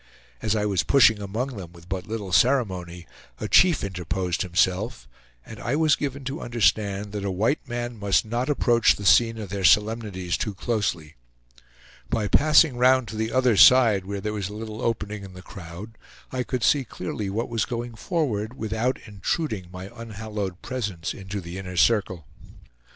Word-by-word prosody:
As 110 -1 0
I 105 -1 0
was 100 -3 +1
pushing 115 -6 +4
among 115 +6 -4
them 90 -3 -9
with 85 0 -16
but 95 -1 -4
little 105 -3 -5
ceremony, 90 -8 +1 0.3
a - - -3
chief 175 -4 +4
interposed 90 -1 -3
himself, 90 - 0 0.4
and 110 - -10
I 120 +4 -1
was 155 -1 +3
given 140 -1 -4
to 140 +5 -5
understand 105 -4 0
that 105 -1 -4
a 100 - -1
white 110 +10 0
man 120 -1 -4
must 100 0 +2
not 120 +5 -2
approach 120 -5 +3
the 100 - -8
scene 115 +3 +5
of 105 -4 -6
their 100 0 -4
solemnities 105 -3 +2
too 105 -3 -3
closely. 90 - -2 0.9
By 110 -2 0
passing 150 - +4
round 130 -1 +3
to - - -7
the 110 +1 -2
other 130 -3 +3
side, 110 -3 +6
where 100 0 -5
there 105 +1 -3
was 100 -3 -3
a 105 - -8
little 110 +1 -7
opening 105 -3 -2
in 95 -1 -10
the 90 0 -11
crowd, 95 +4 -10 0.3
I 130 - -2
could 125 -1 -3
see 145 -2 +3
clearly 105 -3 -5
what 110 +4 -2
was 115 -2 -1
going 120 -1 -5
forward, 125 - -2
without 110 +3 -1
intruding 105 - -3
my 95 +1 -9
unhallowed 105 -4 -6
presence 105 -10 -4
into 95 +1 -6
the 85 +2 -7
inner 90 -1 -7
circle. 95 -7 +2
105 Hz, 175 wpm, -24 LUFS, 95-120 Hz, 0.9 s, side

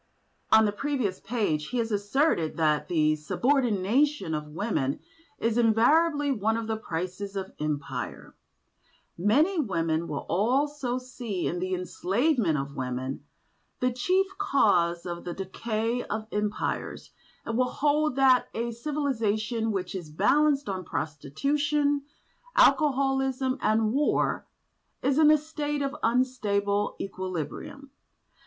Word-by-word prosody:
On 220 0 +7
the 205 - +1
previous 235 -5 -2
page 200 -10 -1
he 250 - -3
has 230 -1 -1
asserted 205 - +1
that 155 -2 +2
"the 155 -3 +2
subordination 240 - +1
of 150 0 -3
women 150 - -2 0.4
is 230 +1 0
invariably 285 +7 +3
one 220 -2 0
of 230 - -3
the 220 0 -1
prices 185 0 -5
of 190 -1 -4
Empire." 150 -2 -4 0.8
Many 290 - +2
women 165 - 0
will 145 - -4
also 255 +5 0
see 245 -7 -5
in 175 - -1
the 185 +1 -1
enslavement 195 - 0
of 140 0 -4
women 130 0 -4 0.6
the 250 0 +1
chief 365 +11 +2
cause 180 - +2
of 175 -1 -5
the 175 -1 -5
decay 225 +5 -2
of 215 +1 -4
Empires, 210 0 -3 0.3
and 230 - -3
will 250 +1 +2
hold 300 0 +1
that 265 -2 +4
a 235 +1 -2
civilisation 230 -5 -1
which 185 -3 -3
is 175 -5 -6
balanced 280 - +2
on 190 -2 -3
prostitution, 285 - 0 0.5
alcoholism 270 - +3
and 220 0 +2
war 290 +2 +1 0.6
is 275 +3 +2
in 305 -1 +7
a 310 - +7
state 295 -1 -3
of 275 +1 -2
unstable 210 -5 +1
equilibrium. 190 - -5
225 Hz, 125 wpm, -27 LUFS, 185-275 Hz, 0.8 s, On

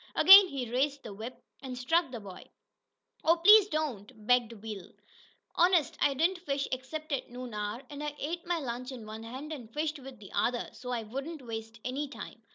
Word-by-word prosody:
Again 390 +1 +10
he 255 -7 -5
raised 275 +2 0
the 210 - -8
whip, 225 +5 -8 0.2
and 255 -3 -6
struck 325 +5 +1
the 240 - -5
boy. 195 -3 -11 0.8
"Oh, 330 +1 +5
please 415 +4 +8
don't!" 255 - -4
begged 245 -1 +3
Will. 210 -4 -8 0.6
"Honest 350 -3 +3
I 285 -1 +3
didn't 345 +6 +1
fish 280 -5 -2
except 300 +5 -5
at 275 - -2
noon 245 -1 -8
hour, 210 +4 -4
an' 290 +1 -8
I 295 0 -4
ate 340 +4 -3
my 350 -1 +1
lunch 255 -3 -5
in 245 -4 -8
one 215 +1 -8
hand, 260 +7 -7
and 240 -7 -9
fished 300 +3 -2
with 265 -1 -11
the 200 -3 -13
other, 240 0 0
so 250 - -9
I 240 -2 -2
wouldn't 275 +6 -6
waste 225 0 -7
any 275 +4 -2
time. 280 - -10
260 Hz, 195 wpm, -30 LUFS, 230-305 Hz, 0.8 s, Again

